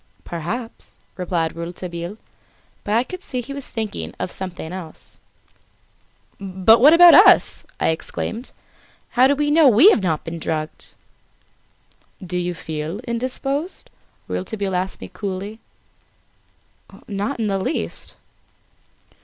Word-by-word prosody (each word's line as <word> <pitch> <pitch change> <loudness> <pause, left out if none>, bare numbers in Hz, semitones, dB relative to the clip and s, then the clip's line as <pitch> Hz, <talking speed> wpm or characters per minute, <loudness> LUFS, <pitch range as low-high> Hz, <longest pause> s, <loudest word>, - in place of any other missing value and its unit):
"Perhaps," 195 +9 -6 0.2
replied 170 -3 -2
Rouletabille; 170 +2 -6 0.7
but 210 - -1
I 235 - +3
could 365 +8 -8
see 255 -8 -4
he 245 +3 -6
was 280 -2 -7
thinking 95 - -4
of 180 - -3
something 180 -3 -5
else. 175 -4 -10 1.2
"But 195 +4 +4
what 290 +4 +8
about 345 0 +9
us?" - - +6
I - - +2
exclaimed. 220 +8 -4 0.6
"How 255 +1 +5
do 285 - +2
we 295 +1 0
know 320 +1 +5
that 225 - +2
we 340 - +8
have 225 - +2
not 160 -5 -1
been 165 0 -6
drugged?" 155 -1 -4 1.2
"Do 180 -2 -4
you 175 0 -2
feel 160 +2 -5
indisposed?" 260 +7 -4 0.4
Rouletabille 195 0 -3
asked 185 +1 -3
me - - -6
coolly. 200 +2 -6 1.5
"Not 205 +6 -3
in 225 - 0
the 195 -2 0
least." 190 - -4
195 Hz, 130 wpm, -21 LUFS, 175-250 Hz, 1.5 s, about